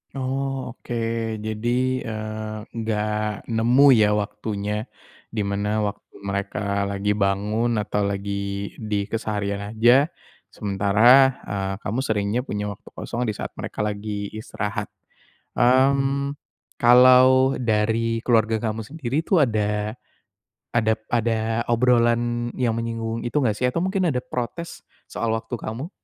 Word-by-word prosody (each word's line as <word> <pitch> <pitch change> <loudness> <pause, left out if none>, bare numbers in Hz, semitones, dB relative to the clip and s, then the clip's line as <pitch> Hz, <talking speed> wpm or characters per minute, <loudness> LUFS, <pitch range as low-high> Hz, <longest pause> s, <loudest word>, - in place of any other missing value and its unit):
Oh, 135 0 -2
oke. 120 0 -7 0.5
Jadi, 120 +4 0
eee, 110 -1 -5
enggak 105 -1 -2
nemu 120 +5 +4
ya 105 -3 +5
waktunya? 105 +1 -3 0.4
Di 110 -2 -3
mana 105 +2 -1
waktu 105 0 -5
mereka 100 0 -2
lagi 100 +1 -1
bangun 105 +4 0
atau 105 -1 0
lagi 100 0 -3
di 105 -2 -1
keseharian 100 -2 -3 0.2
aja, 120 +6 +5 0.4
sementara, 100 +1 -1 0.4
eee, 95 -1 -3
kamu 115 +7 -2
seringnya 105 -2 0
punya 105 0 -3
waktu 100 - -13
kosong 120 0 -3
di 105 - -2
saat - - -5
mereka - - -4
lagi 105 -1 -3
istirahat. 105 -1 -4 0.7
Mmm, 135 +2 +3 0.4
kalau 130 +2 +6
dari 115 0 0
keluarga 110 -2 +2
kamu 110 0 -4
sendiri 140 0 -3
tuh 180 -6 +3
ada 105 -2 -1 0.7
ada 110 -2 +2 0.2
ada 115 0 0
obrolan 120 0 +2
yang 115 -3 0
menyinggung 115 0 -3
itu 120 - -5
enggak 110 -5 +1
sih? 125 - 0
Atau 125 +7 0
mungkin 190 -1 +1
ada 125 - -1
protes 125 +8 -5 0.2
soal 115 -1 -1
waktu 115 +2 -3
kamu? 115 +9 -6
110 Hz, 125 wpm, -23 LUFS, 105-120 Hz, 0.7 s, kalau